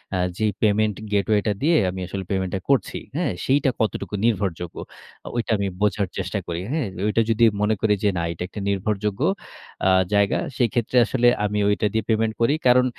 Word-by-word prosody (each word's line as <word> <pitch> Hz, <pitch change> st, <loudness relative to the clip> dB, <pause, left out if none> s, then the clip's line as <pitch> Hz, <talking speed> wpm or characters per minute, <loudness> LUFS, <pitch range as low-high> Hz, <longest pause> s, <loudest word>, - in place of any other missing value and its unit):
আ -, -, +1 dB, 0.2 s
যেই 110 Hz, -1 st, +1 dB
payment 105 Hz, -1 st, +2 dB, 0.2 s
gateway 105 Hz, +1 st, +2 dB
টা -, -, +3 dB
দিয়ে 165 Hz, +3 st, +3 dB
আমি 95 Hz, +1 st, -5 dB
আসলে 95 Hz, 0 st, -4 dB
payment 95 Hz, -2 st, -1 dB
টা -, -, -1 dB
করছি, 140 Hz, -2 st, +1 dB, 0.2 s
হ্যাঁ? 170 Hz, -6 st, 0 dB
সেইটা 135 Hz, 0 st, +3 dB
কতটুকু 110 Hz, -1 st, -2 dB
নির্ভরযোগ্য? 95 Hz, -6 st, -1 dB, 0.5 s
অ -, -, -9 dB
ঐটা 120 Hz, -, -1 dB
আমি 100 Hz, 0 st, -1 dB
বোঝার 105 Hz, -1 st, +1 dB
চেষ্টা 95 Hz, +2 st, -2 dB
করি, 85 Hz, 0 st, -3 dB
হ্যাঁ? 150 Hz, -8 st, -1 dB, 0.2 s
ঐটা 110 Hz, +2 st, +2 dB
যদি 115 Hz, +1 st, +2 dB, 0.2 s
মনে 105 Hz, +1 st, +2 dB
করি 110 Hz, -1 st, +3 dB
যে 105 Hz, -, +4 dB
না -, -, 0 dB
এটা 85 Hz, +1 st, -5 dB
একটা 105 Hz, -, -8 dB
নির্ভরযোগ্য 100 Hz, +2 st, -1 dB, 0.7 s
আ -, -, +5 dB, 0.2 s
জায়গা। 100 Hz, -1 st, +3 dB, 0.2 s
সেক্ষেত্রে 120 Hz, 0 st, +1 dB
আসলে 120 Hz, -1 st, +2 dB, 0.2 s
আমি 105 Hz, 0 st, -1 dB
ওইটা 105 Hz, -, +1 dB
দিয়ে 110 Hz, 0 st, 0 dB
payment 110 Hz, 0 st, +1 dB
করি। 115 Hz, +5 st, +4 dB
কারণ 125 Hz, +1 st, +5 dB
105 Hz, 190 wpm, -23 LUFS, 100-115 Hz, 0.7 s, আ